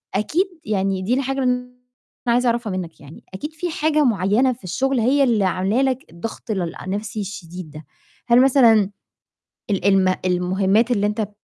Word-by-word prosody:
أكيد 315 - +1 0.2
يعني 195 -2 -1
دي 210 +6 0
الحاجة 270 0 -1
اللي 250 0 -2 0.5
أنا 235 - +4
عايزة 250 +1 +2
أعرفها 230 -3 -1
مِنّك 180 -3 -5
يعني 145 +2 -13
أكيد 300 +11 -6
في 350 +3 -4
حاجة 305 -1 +1
معيّنة 225 +3 +2
في 235 - -19
الشغل 260 +8 0
هي 275 +5 +3
اللي 220 -6 +2
عاملة 190 +7 +1
لك 265 -1 0
الضغط 220 +6 -7
ل 180 -5 -2
النَفْسي 205 +3 -4
الشديد 180 -4 -8
ده، 155 0 -11 0.4
هل 240 +1 +6
مثلًا 235 -7 +5 0.8
ال 195 -2 -1
الم 190 -2 +4
المهمّات 190 +5 +1
اللي 205 -3 +2
أنت 210 +1 -2
بت 205 - -3
215 Hz, 175 wpm, -21 LUFS, 190-250 Hz, 0.8 s, هل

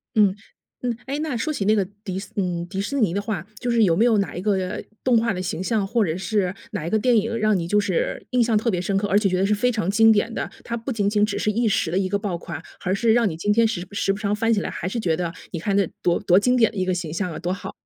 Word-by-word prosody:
嗯， 205 -3 +4 0.5
嗯。 245 -2 -1
哎， 275 +2 -3
那 305 -5 -2
说 310 +7 -1
起 200 - -2
那 215 +2 +4
个 200 -3 +1 0.2
迪 190 -3 -4
斯 200 - -10
嗯， 180 -3 -1
迪 190 +2 -5
士 275 +7 -2
尼 200 -7 +2
的 200 - 0
话， 205 -5 -4
就 245 - -3
是 235 -1 +4
有 170 -5 +4
没 220 +7 +3
有 230 -3 +4
哪 195 -6 -2
一 180 - -4
个， 205 +1 +2
呃， 185 -1 -2 0.2
动 250 -2 +4
画 230 -1 +1
的 185 - -3
形 185 0 -3
象， 210 -1 0
或 230 +1 +2
者 160 -1 -2
是 190 0 0 0.2
哪 155 - -4
一 - - -1
个 220 - +2
电 245 +3 +3
影 230 +2 0
让 215 -2 +2
你 170 -2 -3
就 210 +4 +3
是 485 - -1
印 250 -1 +3
象 225 -2 +2
特 225 +2 +1
别 180 - -1
深 195 +2 -1
刻， 205 +1 0
而 200 - +3
且 210 - +1
觉 185 - 0
得 190 - +2
是 210 - +2
非 250 +5 +2
常 215 -6 -1
经 225 +2 +6
典 215 +2 +1
的。 - - -3
它 235 - -4
不 230 +4 -5
仅 205 -4 +1
仅 210 0 +3
只 205 -1 -3
是 210 - +1
一 230 +2 +1
时 180 -5 +1
的 180 - 0
一 190 -1 +1
个 200 - +1
爆 200 -4 -3
款， 170 -2 -7 0.2
而 185 - +1
是 225 +2 +3
让 230 -3 +3
你 160 - -5
今 205 +5 0
天 230 +1 +4
时 185 -5 -3
时 195 -1 0
不 195 - -7
常 210 -1 0
翻 225 +2 +2
起 210 - +1
来， - - -3
还 175 - -4
是 230 +5 -2
觉 170 -6 +1
得 170 -1 -2 0.2
你 170 - -4
看 195 +4 -1
这 200 -4 +3
多 175 -1 +2
多 180 +1 +4
经 250 +4 +2
典 230 -3 +4
的 - - -10
一 185 - 0
个 185 - +1
形 175 -3 -4
象 180 +1 -2
啊， 155 - -6
多 175 +2 -2
好。 195 - -7
205 Hz, 345 characters per minute, -23 LUFS, 185-225 Hz, 0.5 s, 经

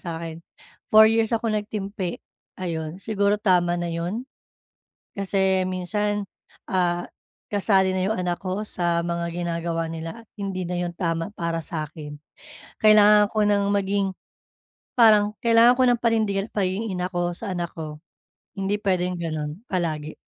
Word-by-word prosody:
sa'kin, 165 -1 -6 0.5
4 215 0 +8
years 225 0 +3
ako 225 -1 -2
nagtimpi. 205 -3 -3 0.4
Ayon, 165 -2 -4
siguro 205 0 +1
tama 180 -4 +2
na 175 -1 -3
yun. 180 +9 -3 0.9
Kasi 190 -1 +1
minsan, 205 +3 -1 0.5
ah, 175 -2 +1 0.5
kasali 195 -2 +3
na 185 +1 0
yung 220 - 0
anak 175 -1 -1
ko 190 +3 -2
sa 175 -3 0
mga 170 0 -2
ginagawa 170 -1 -2
nila, 165 +7 -6
at - - -43
hindi 190 -2 -3
na 180 +1 -3
yung 175 -1 -3
tama 165 0 -1
para 170 -1 -2
sa'kin. 155 -2 -6 0.6
Kailangan 210 -1 +7
ko 215 -1 +2
ng 205 -1 +2
maging 200 0 +1 0.9
parang 210 -2 +6
kailangan 235 +1 +6
ko 255 - +6
ng 240 -1 +3
panindigan 215 -4 +1
pagiging 200 +2 -1
ina 180 0 -2
ko 175 0 -1
sa 205 +2 -5
anak 175 -1 -3
ko. 155 -2 -7 0.6
Hindi 195 +1 0
pwedeng 180 -2 0
ganun 155 +2 -4
palagi. 155 -4 -2
185 Hz, 140 wpm, -24 LUFS, 170-205 Hz, 0.9 s, 4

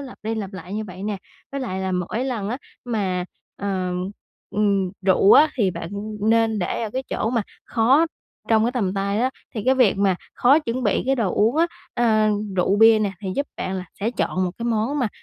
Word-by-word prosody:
lặp 270 -3 -9
đi 220 +1 -2
lặp 205 -3 -4
lại 185 +1 -7
như 215 - -2
vậy 185 -2 -9
nè. 210 0 -2 0.4
Với 275 - -3
lại 190 -7 -3
là 190 0 -2
mỗi 180 +7 -2
lần 230 -7 -2
á 240 - -2 0.3
mà 195 -7 -1 0.3
ờm, 185 -1 -2 0.4
ừm, 200 -2 +1 0.2
rượu 195 +1 +6
á, 310 +1 +7
thì 210 -8 +2
bạn 170 -1 -6 0.3
nên 225 0 +2
để 185 +5 -2
ở 220 - -3
cái 260 +4 -2
chỗ 220 - -1
mà 235 -3 +1 0.2
khó 260 +8 +3 0.4
trong 220 -1 +4
cái 240 - 0
tầm 200 -7 -1
tay 200 +2 0
á, 255 +2 +2 0.2
thì 215 - -3
cái 260 +1 +4
việc 250 -6 +4
mà 195 -2 +2 0.2
khó 270 +5 +5
chuẩn 255 -4 -3
bị 210 -4 +1
cái 270 - +3
đồ 225 -8 0
uống 225 +7 +2
á, 330 +1 +4 0.3
ờ, 220 -3 +3 0.3
rượu 185 +2 +2
bia 225 +1 +7
nè, 205 -2 0
thì 195 - -4
giúp 285 - -1
bạn 190 - -3
là 185 - -4 0.2
sẽ 215 +3 0
chọn 185 -5 -1
một 180 - -1
cái 235 - -4
món 235 +5 0
mà 250 -5 +1
215 Hz, 225 wpm, -23 LUFS, 190-240 Hz, 0.4 s, á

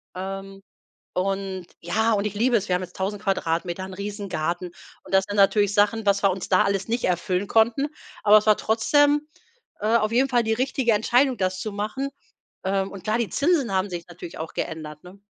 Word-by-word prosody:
Ähm, 195 +1 -6 0.5
und 190 -1 -2
ja, 220 +7 +1
und 205 -1 +1
ich 210 - -3
liebe 240 +3 +2
es, 205 - -2
wir 180 - +2
haben 180 - -4
jetzt 180 - -13
1.000 200 +2 -3
Quadratmeter, 175 -2 -1
'n 190 - -8
Riesengarten. 185 -4 -3 0.3
Und - - -14
das 190 0 +5
sind 205 - -3
natürlich 205 0 +4
Sachen, 210 +1 +2
was 200 0 +3
wir 195 - +5
uns 185 0 -4
da 185 - +4
alles 200 -1 0
nicht 235 +2 -1
erfüllen 185 +2 0
konnten, 230 +6 +3 0.3
aber 210 0 +7
es 215 - -4
war 215 - +6
trotzdem, 290 +7 +2 0.5
äh, 220 +2 +3
auf 215 0 +1
jeden 260 +3 +3
Fall 240 -3 +2
die 220 - 0
richtige 255 0 +1
Entscheidung, 245 +5 +3
das 185 0 -1
zu 215 - -4
machen. 215 +7 -3 0.5
Ähm, 195 0 0
und 195 -2 -9
klar, 215 +2 +1
die 235 -3 -1
Zinsen 280 - +1
haben 190 +1 0
sich 175 -1 -6
natürlich 175 0 -9
auch 160 0 -6
geändert, 150 -1 -5
ne? 180 +2 -13
200 Hz, 205 wpm, -24 LUFS, 185-225 Hz, 0.5 s, aber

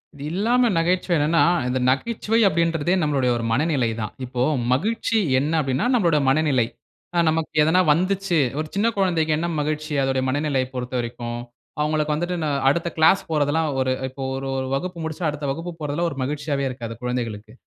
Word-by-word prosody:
இது 140 - -9
இல்லாம 235 +7 +2
நகைச்சுவை 175 +1 +1
என்னனா, 155 +3 +3 0.2
இந்த 130 +1 0
நகைச்சுவை 220 - 0
அப்படின்றதே 165 0 +1
நம்முடைய 140 -5 +1
ஒரு 115 - -3
மனநிலை 135 -1 +1
தான். 105 - -4
இப்போ 125 0 -4 0.3
மகிழ்ச்சி 225 - 0 0.2
என்ன 150 +4 -1
அப்படினா 135 - 0
நம்முடைய 170 -10 +3
மனநிலை. 135 -4 +2 0.5
ஆ - - +1
நமக்கு 160 0 -1
எதனா 160 +4 +3
வந்துச்சு, 185 +1 0 0.2
ஒரு 155 - -2
சின்ன 205 +3 +2
குழந்தைக்கு 170 -5 +1
என்ன 170 +2 -1
மகிழ்ச்சி 155 +1 -2
அதனுடைய 135 -1 0
மனநிலையை 140 -2 0
பொறுத்தவரைக்கும், 120 -1 -4 0.4
அவங்களுக்கு 150 0 +1
வந்துட்டு, 175 +3 -2 0.3
அடுத்த 170 +4 0
கிளாஸ் 160 +5 +5
போறது 145 -2 +1
எல்லாம் 160 0 +1
ஒரு 130 0 +1 0.2
இப்போ 135 +1 -7
ஒரு 135 0 -4
ஒரு 130 0 -2
வகுப்பு 180 +5 -4
முடிச்சா 160 +2 -4
அடுத்த 150 0 -5
வகுப்பு 165 +5 -5
போறதெல்லாம் 155 +3 -1
ஒரு 140 - -8
மகிழ்ச்சியாவே 145 0 -2
இருக்காது 120 -3 -6
குழந்தைகளுக்கு. 115 -4 -4
150 Hz, 165 wpm, -23 LUFS, 130-170 Hz, 0.5 s, கிளாஸ்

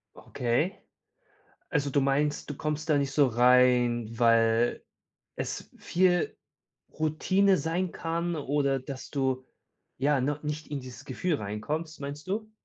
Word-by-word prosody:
Okay. 125 - -1 0.9
Also, 145 -3 0
du 140 +1 +2
meinst, 145 +3 0
du 145 - -4
kommst 150 +2 -3
da 150 - +4
nicht 140 -1 0
so 140 0 +4
rein, 125 -1 +4
weil 115 0 +3 0.5
es - - -5
viel 180 -1 +1 0.6
Routine 185 +6 +2
sein 165 +4 -1
kann, 170 +1 -2
oder, 140 -2 0
dass 130 0 -8
du, 130 -2 -1 0.5
ja, 140 +1 +2
noch 145 +3 -2
nicht 150 +1 -4
in 145 -1 -4
dieses 130 +1 -10
Gefühl 180 +1 -1
reinkommst, 145 +9 -4
meinst 145 +2 -7
du? 215 +3 -3
145 Hz, 135 wpm, -28 LUFS, 125-160 Hz, 0.9 s, da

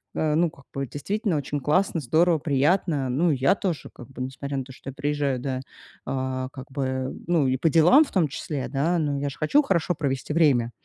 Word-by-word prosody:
э, 155 -1 +1
ну, 165 0 +2
как 140 -5 -19
бы, 135 0 -2
действительно 200 - -2
очень 145 +1 -3
классно, 165 +6 +1
здорово, 160 +5 +3
приятно. 145 0 +1
Ну 160 +7 +2
и 140 - 0
я 135 +8 +3
тоже, 180 -9 -3
как 120 - -12
бы, 130 -1 -9
несмотря 135 +2 -4
на 135 - -2
то, 130 - -13
что 130 +1 -9
я - - -15
приезжаю, 145 -2 -1
да, 130 0 -3 0.4
а, 130 -1 -2
как 130 -1 -10
бы, 130 -1 -2 0.2
ну 165 -5 +2
и 130 0 +1
по 160 +5 +2
делам 170 - +6
в - - -13
том 180 -5 +2
числе, 140 0 -4
да, 160 +6 +1
ну 145 -3 0
я 140 0 -1
же 135 - -10
хочу 285 - +3
хорошо 180 - 0
провести 135 -2 -2
время. 135 -8 +3
145 Hz, 220 wpm, -25 LUFS, 130-165 Hz, 0.4 s, делам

